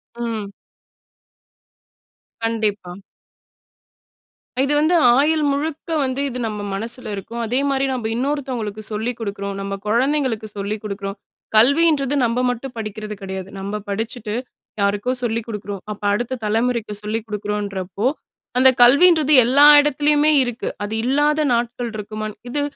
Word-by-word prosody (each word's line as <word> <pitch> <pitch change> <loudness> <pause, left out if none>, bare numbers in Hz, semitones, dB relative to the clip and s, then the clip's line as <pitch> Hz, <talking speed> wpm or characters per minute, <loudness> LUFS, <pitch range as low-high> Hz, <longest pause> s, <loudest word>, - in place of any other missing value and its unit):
ம். 225 -4 -4 1.9
கண்டிப்பா. 210 -5 -2 1.6
அ - - -4
இது 290 - 0
வந்து 315 +4 +3 0.2
ஆயுள் 305 +2 +3
முழுக்க 305 +3 -3
வந்து 260 +1 -1
இது 250 - -6
நம்ம 210 -1 -5
மனசில 225 +2 -4
இருக்கும். 230 +4 -6
அதேமாரி 270 +3 0
நம்ப 240 -3 -4
இன்னொருத்தவங்களுக்கு 250 -5 -3
சொல்லிக் 220 +3 -2
குடுக்கறோம். 200 -2 -4
நம்ப 195 0 -4
குழந்தைகளுக்கு 245 -1 +1
சொல்லிக் 205 +1 -3
குடுக்கறோம். 200 -1 -5 0.4
கல்வின்றது 280 +3 +4
நம்ப 235 +1 0
மட்டும் 245 +2 -4
படிக்கிறது 215 -1 -5
கிடையாது. 190 0 -6
நம்ப 200 +2 -4
படிச்சுட்டு, 220 +1 -4 0.5
யாருக்கோ 205 +5 +1
சொல்லிக் 230 -1 -1
குடுக்கறோம். 205 -3 -6
அப்ப 210 - -8
அடுத்த 240 +4 -2
தலைமுறைக்கு 225 0 0
சொல்லிக் 215 +1 -3
குடுக்குறோன்றப்போ, 205 -1 -3 0.5
அந்த 260 +1 +7
கல்வின்றது 300 +4 +6
எல்லா 280 +4 +6
இடத்திலயுமே 295 +1 +2
இருக்கு. 245 -2 -3
அது 210 +2 -4
இல்லாத 295 +4 +2
நாட்கள் 235 0 -2
இருக்குமான் 215 0 -5
இது 290 +3 -1
230 Hz, 120 wpm, -20 LUFS, 210-270 Hz, 1.9 s, அந்த